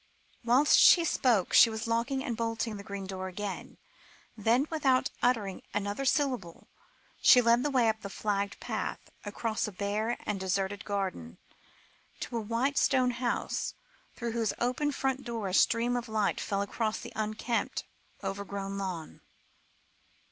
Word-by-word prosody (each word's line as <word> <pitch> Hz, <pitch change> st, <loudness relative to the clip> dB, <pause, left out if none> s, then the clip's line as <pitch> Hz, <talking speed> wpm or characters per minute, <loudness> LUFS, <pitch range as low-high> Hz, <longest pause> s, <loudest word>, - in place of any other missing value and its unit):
Whilst 250 Hz, +5 st, +5 dB
she 340 Hz, -2 st, +7 dB
spoke, 240 Hz, -, +2 dB
she 230 Hz, -, +8 dB
was 220 Hz, 0 st, -4 dB
locking 235 Hz, +4 st, 0 dB
and 240 Hz, -, -2 dB
bolting 225 Hz, -1 st, -2 dB
the 200 Hz, -, -8 dB
green 200 Hz, -1 st, -6 dB
door 190 Hz, 0 st, -5 dB
again; 195 Hz, +1 st, -6 dB, 0.6 s
then, 230 Hz, +5 st, +2 dB
without 270 Hz, -5 st, +2 dB
uttering 220 Hz, -6 st, +1 dB
another 205 Hz, +6 st, -2 dB
syllable, 255 Hz, -, -1 dB, 0.5 s
she 250 Hz, -, +8 dB
led 235 Hz, 0 st, +4 dB
the 295 Hz, -, 0 dB
way 255 Hz, -4 st, +3 dB
up 220 Hz, 0 st, -1 dB
a 200 Hz, -, -5 dB
flagged 200 Hz, 0 st, -2 dB
path, -, -, -4 dB
across 215 Hz, +2 st, -2 dB
a -, -, -5 dB
bare 210 Hz, +4 st, -2 dB
and 210 Hz, -2 st, -2 dB
deserted 190 Hz, +1 st, -2 dB
garden, 185 Hz, -, -3 dB, 0.8 s
to -, -, -5 dB
a -, -, -1 dB
white 235 Hz, +6 st, 0 dB
stone 255 Hz, -2 st, +3 dB
house, 240 Hz, 0 st, -2 dB, 0.4 s
through 235 Hz, -1 st, -3 dB
whose 225 Hz, -2 st, 0 dB
open 255 Hz, +5 st, 0 dB
front 270 Hz, -1 st, -1 dB
door 230 Hz, -5 st, -3 dB
a -, -, -5 dB
stream 230 Hz, +4 st, +3 dB
of 240 Hz, -1 st, -3 dB
light 215 Hz, -2 st, 0 dB
fell 200 Hz, 0 st, -1 dB
across 215 Hz, +1 st, -2 dB
an -, -, -8 dB
unkempt, 215 Hz, +2 st, -2 dB, 0.4 s
overgrown 200 Hz, 0 st, -4 dB
lawn. 180 Hz, -5 st, -5 dB
220 Hz, 150 wpm, -30 LUFS, 200-245 Hz, 0.8 s, she